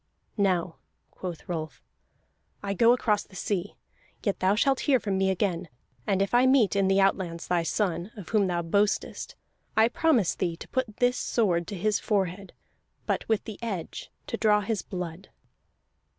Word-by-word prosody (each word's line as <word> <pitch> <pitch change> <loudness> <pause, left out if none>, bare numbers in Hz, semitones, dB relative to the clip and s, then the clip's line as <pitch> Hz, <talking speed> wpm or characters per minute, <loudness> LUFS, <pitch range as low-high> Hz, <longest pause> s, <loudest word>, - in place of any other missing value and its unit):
"Now," 180 -4 +1 0.3
quoth 175 +1 -7
Rolf, 160 -4 -4 0.8
"I 200 0 -1
go 230 +4 +5
across 220 -4 +2
the 190 - -16
sea, 195 0 -2 0.5
yet 200 - 0
thou 190 +2 +3
shalt 270 +4 +2
hear 265 -3 +5
from 200 -4 -2
me 190 0 +2
again. 185 -3 -1 0.4
And 195 -1 +2
if 195 - -4
I 245 +2 +5
meet 255 -7 +4
in 195 -1 +3
the 195 +1 +3
outlands 185 -4 +1
thy 175 -1 +2
son, 175 0 -1
of 195 -6 -9
whom 210 -3 +3
thou 175 -1 -1
boastest, 200 +5 0 0.4
I 220 +1 +6
promise 255 - +2
thee 170 -3 -2
to - - -10
put 250 -5 -2
this 245 0 +2
sword 175 -7 +1
to 205 - -5
his 205 +3 +1
forehead, 195 -2 -1 0.5
but - - -2
with 220 -2 +2
the 215 - -8
edge, 200 -8 -5
and - - -42
to - - -2
draw 210 -1 +4
his 205 0 -2
blood." 180 -1 -6
195 Hz, 175 wpm, -27 LUFS, 180-215 Hz, 0.8 s, I